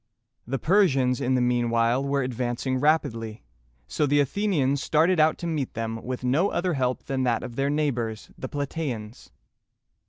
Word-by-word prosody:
The 135 +2 -1
Persians 135 - +2
in 130 +1 +1
the 125 - +2
mean 120 -1 +1
while 115 +3 +2
were 140 0 0
advancing 125 +1 -2
rapidly, 125 -7 0 0.4
so 150 - 0
the 145 +1 +3
Athenians 145 -3 +1
started 165 +3 +2
out 155 +1 +4
to - - -6
meet 155 -6 -2
them 115 0 -4
with 125 0 -5
no 145 +11 +2
other 180 0 -1
help 130 -3 -1
than 135 -1 -2
that 120 -3 +1
of 120 - -7
their 135 +2 0
neighbors 125 -7 -2
the 130 - -6
Pla 145 -1 -2
tæ´ans. 125 -8 -6
130 Hz, 175 wpm, -25 LUFS, 120-150 Hz, 0.4 s, out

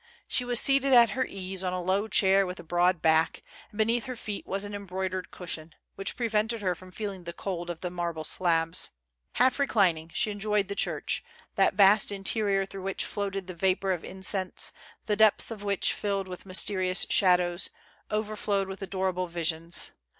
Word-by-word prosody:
She 250 - +1
was 245 -1 +5
seated 275 0 +4
at 235 -3 +7
her 255 +3 -1
ease 190 -1 -4
on 180 -1 -2
a 185 - -2
low 195 +4 0
chair 195 -2 +3
with 180 +1 -7
a - - -9
broad 175 +1 +1
back, 160 0 +2 0.3
and 210 - -15
beneath 230 +3 +1
her 255 -1 -5
feet 210 -3 -6
was 195 +1 -2
an 205 - -8
embroidered 190 -2 -4
cushion, 165 -3 -5 0.2
which 195 0 -4
prevented 225 -1 -1
her 185 -2 +1
from 185 +2 -13
feeling 195 -2 -6
the 170 - -6
cold 175 -2 -5
of 170 -2 -6
the 180 - -4
mar 175 -1 -2
ble 160 -1 -7
slabs. 165 +1 +1 0.4
Half 255 +3 +2
reclining, 180 - +1
she 220 +3 +1
enjoyed 205 -1 -1
the - - -2
church, 200 - 0 0.3
that - - +2
vast 205 +1 +5
interior 195 0 +2
through 195 0 -9
which 195 0 -2
floated 195 -2 -3
the 185 - -7
vapor 190 +2 0
of 175 -3 -3
incense, 190 0 -1 0.3
the 210 - 0
depths 220 +1 +4
of 215 -3 -7
which, 200 -1 +1
filled 200 -2 -2
with 180 +1 -9
mysterious 185 0 +4
shadows, 180 -2 +3 0.4
overflowed 210 -2 -1
with 195 +1 -8
adorable 185 -1 -2
visions. 170 0 0
195 Hz, 185 wpm, -27 LUFS, 180-210 Hz, 0.4 s, at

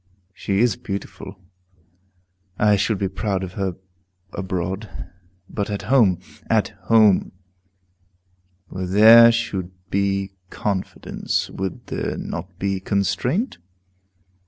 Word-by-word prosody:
She 100 +1 -1
is 120 -5 +2
beautiful; 100 -1 -7 1.2
I 105 -1 +4
should 100 +1 0
be 95 - -1
proud 95 0 -2
of 90 -1 -6
her 95 -3 -2 0.6
abroad. 95 +2 -3 0.6
But 100 0 -3
at 100 -1 -3
home, 105 -10 +5 0.3
at - - +2 0.2
home, 110 -4 +4 1.4
where 95 0 -4
there 115 +5 +8
should 110 -6 -2 0.2
be 100 0 0 0.2
confidence, 100 -3 -3
would 95 -2 -5
there - - -3
not - - -6
be 100 0 -1
constraint? 115 - -1
100 Hz, 105 wpm, -22 LUFS, 95-110 Hz, 1.4 s, there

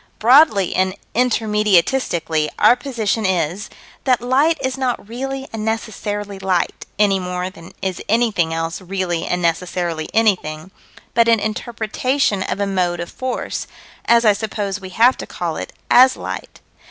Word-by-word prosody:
Broadly 235 - +5
and 185 0 +1 0.2
intermediatistically, 210 -8 +1
our 215 +3 +6
position 230 -5 -2
is: 185 0 -1 0.4
That 255 -4 +3
light 275 +7 +2
is 260 0 -2
not 255 -5 -2
really 270 +3 -5
and 220 -1 -4
necessarily 205 -2 -3
light 190 -2 -1
any 200 -2 +3
more 180 0 -3
than 165 -3 -14
is 190 -2 -2
anything 215 -7 +2
else 165 +2 -3
really 180 -2 -2
and 180 0 -1
necessarily 170 -1 -1
anything 185 -6 0 0.4
but 230 0 +4
an 230 -1 +4
interpretation 225 +1 -1
of 190 - -3
a 200 - +1
mode 180 -3 0
of 175 - -5
force, 255 -1 -4 0.4
as 235 0 +4
I 210 - +6
suppose 205 -1 -3
we 190 - -8
have 235 +7 +4
to - - -7
call - - -4
it, - - -6 0.2
as 255 +1 +7
light. - - -7
205 Hz, 150 wpm, -19 LUFS, 180-235 Hz, 0.4 s, as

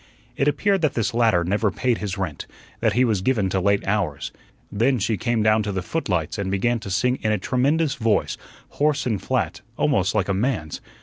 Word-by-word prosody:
It 140 - +1
appeared 195 +5 +2
that 155 -4 +1
this 115 +1 0
latter 115 -7 +3
never 100 +4 +1
paid 120 +4 0
his 100 -2 -4
rent; 90 -8 -4 0.3
that 110 -2 +2
he 125 +3 +3
was 105 -6 0
given 105 -4 +1
to 95 - +1
late 100 +1 +1
hours. 90 -9 -1 0.4
Then 120 +6 +2
she 110 +1 0
came 115 +2 0
down 110 0 +4
to 105 -1 -3
the 95 -2 -3
footlights 95 - -2
and 100 -1 -2
began 115 +5 +1
to 100 - -8
sing 125 +7 +1
in 110 - +1
a 105 - +2
tremendous 140 - +1
voice, 110 -2 0 0.3
hoarse 150 0 0
and 110 -6 -1
flat, - - -1 0.2
almost - - +1
like - - +1
a 100 - +1
man's. 95 - -2
110 Hz, 205 wpm, -23 LUFS, 95-125 Hz, 0.4 s, down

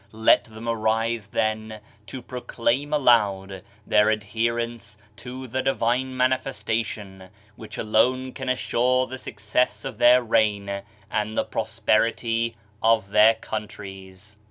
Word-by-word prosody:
Let 110 +1 +4
them 110 +1 -10
arise 115 -1 0
then 110 0 -2 0.3
to 130 -2 -7
proclaim 125 +2 -2
aloud 100 -9 +2 0.2
their 105 0 +4
adherence 115 0 -2 0.2
to 130 +1 -8
the 130 +2 -2
Divine 130 0 0
Manifesta 130 -3 0
tion, 95 -3 -9 0.3
which 110 - -10
alone 130 +4 +1
can 130 -2 -5
assure 130 0 +1
the 130 +1 -8
success 110 +2 -1
of 130 -5 -6
their 125 +1 +6
reign 100 -3 +1 0.3
and 105 +1 -2
the - - +3
prosperity 115 +1 0 0.3
of 110 -3 +2
their 105 +2 +6
countries. 100 -2 -8
115 Hz, 120 wpm, -24 LUFS, 105-125 Hz, 0.3 s, their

